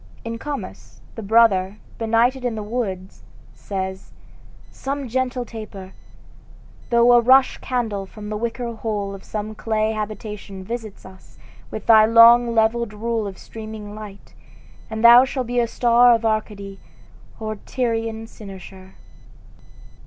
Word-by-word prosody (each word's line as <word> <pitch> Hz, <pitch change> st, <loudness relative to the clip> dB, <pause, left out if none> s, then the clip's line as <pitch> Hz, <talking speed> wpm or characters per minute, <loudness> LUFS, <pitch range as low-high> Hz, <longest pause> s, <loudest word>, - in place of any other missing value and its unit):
In 230 Hz, 0 st, -5 dB
"Comus," 290 Hz, +1 st, -7 dB
the 225 Hz, -, -7 dB
brother, 205 Hz, -3 st, +3 dB, 0.2 s
benighted 235 Hz, +3 st, +1 dB
in 245 Hz, -2 st, -1 dB
the 215 Hz, -, -5 dB
woods, 205 Hz, -5 st, -4 dB, 0.3 s
says: 190 Hz, -1 st, -6 dB, 0.3 s
"... -, -, -25 dB, 0.3 s
Some 275 Hz, 0 st, -4 dB
gentle 250 Hz, 0 st, -2 dB
taper! 205 Hz, -5 st, -9 dB, 1.0 s
Though 235 Hz, 0 st, +5 dB
a 240 Hz, -, +6 dB
rush 260 Hz, +2 st, +4 dB
candle, 220 Hz, -6 st, -3 dB
from 210 Hz, +1 st, -10 dB
the 215 Hz, -, -3 dB
wicker 235 Hz, +2 st, -3 dB
hole 210 Hz, -3 st, -4 dB
Of 195 Hz, -1 st, -10 dB
some 215 Hz, 0 st, -5 dB
clay 215 Hz, 0 st, -1 dB
habitation, 210 Hz, -2 st, -6 dB
visit 225 Hz, 0 st, -7 dB
us 190 Hz, 0 st, -16 dB, 0.3 s
With 215 Hz, -, -7 dB
thy 220 Hz, -1 st, +7 dB
long 235 Hz, +1 st, +6 dB
levelled 225 Hz, 0 st, +1 dB
rule 225 Hz, 0 st, -2 dB
of 195 Hz, -, -8 dB
streaming 215 Hz, -2 st, -9 dB
light, 210 Hz, -2 st, -11 dB, 0.6 s
And 220 Hz, 0 st, -4 dB
thou 240 Hz, +2 st, +9 dB
shalt 265 Hz, -1 st, -3 dB
be 245 Hz, +1 st, -1 dB
our 235 Hz, -, 0 dB
star 240 Hz, +1 st, +4 dB
of 230 Hz, 0 st, -3 dB
Arcady, 205 Hz, -3 st, -3 dB, 0.6 s
Or 215 Hz, -1 st, -4 dB
Tyrian 225 Hz, -2 st, -3 dB
Cynosure." 190 Hz, -3 st, -12 dB
220 Hz, 140 wpm, -21 LUFS, 205-235 Hz, 1.0 s, thou